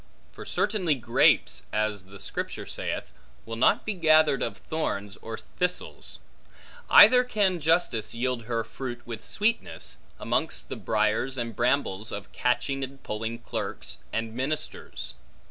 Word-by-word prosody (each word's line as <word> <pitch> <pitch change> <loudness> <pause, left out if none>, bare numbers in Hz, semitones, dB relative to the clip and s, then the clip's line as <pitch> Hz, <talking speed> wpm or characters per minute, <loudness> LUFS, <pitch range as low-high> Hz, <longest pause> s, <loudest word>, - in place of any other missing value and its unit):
For - - -10
certainly 195 -8 +1
grapes 120 -2 +3
(as 105 -2 -1
the 95 +1 -13
Scripture - - -4
saith) - - -4 0.3
will 115 - -5
not 115 - +3
be 220 - -1
gathered 155 -5 +4
of 110 -4 -2
thorns 105 -11 -3
or 110 0 -7
thistles; 180 0 -3 0.7
neither 250 0 +9
can 200 -7 +1
justice 150 -9 +1
yield 120 -1 -1
her 115 -1 -1
fruit 120 -1 -7
with 115 -2 -7
sweetness, 230 +3 -1 0.2
amongst 60 -1 -1
the - - -3
briars 110 +5 0
and 115 -3 -3
brambles 120 -4 +1
of 100 -1 -6
catching 135 +2 0
and 135 +1 -7
polling 110 +2 -4
clerks, - - -5
and 115 0 -2
ministers. 145 +5 -4
120 Hz, 135 wpm, -27 LUFS, 110-155 Hz, 0.7 s, neither